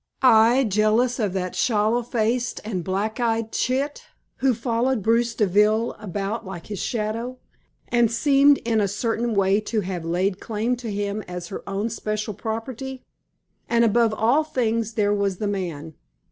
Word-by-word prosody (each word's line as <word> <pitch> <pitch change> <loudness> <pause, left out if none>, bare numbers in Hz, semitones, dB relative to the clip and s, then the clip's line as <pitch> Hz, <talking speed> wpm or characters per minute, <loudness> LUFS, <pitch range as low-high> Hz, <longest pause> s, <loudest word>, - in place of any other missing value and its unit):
I 240 +1 +6
jealous 220 +3 +2
of 205 -5 0
that 185 -1 -3
sallow 220 +1 +2
faced 240 +1 -1
and 190 -5 -3
black 200 +6 -2
eyed 230 -2 0
chit, 275 +3 -1 0.3
who 260 -2 +2
followed 235 0 0
Bruce 230 +1 +2
Deville 210 +3 +3
about 205 +2 -3
like 185 -3 -8
his 205 -3 -6
shadow, 230 +2 -3 0.5
and 240 -2 +2
seemed 280 +3 +5
in 225 -2 +2
a 200 - +2
certain 225 +3 -1
way 195 +1 +3
to 215 0 -1
have 180 -3 -4
laid 180 +3 0
claim 225 +3 -1
to 235 -3 -5
him 205 +1 -2
as 180 -1 -6
her 195 - -6
own 200 +2 -2
especial 215 -1 -3
property. 240 +5 -5 0.7
And 235 0 +4
above 230 +1 +3
all 240 +9 +3
things 230 -6 -1
there 205 -2 +2
was 200 -2 0
the 210 - -3
man. 170 -6 -4
220 Hz, 160 wpm, -23 LUFS, 200-235 Hz, 0.7 s, I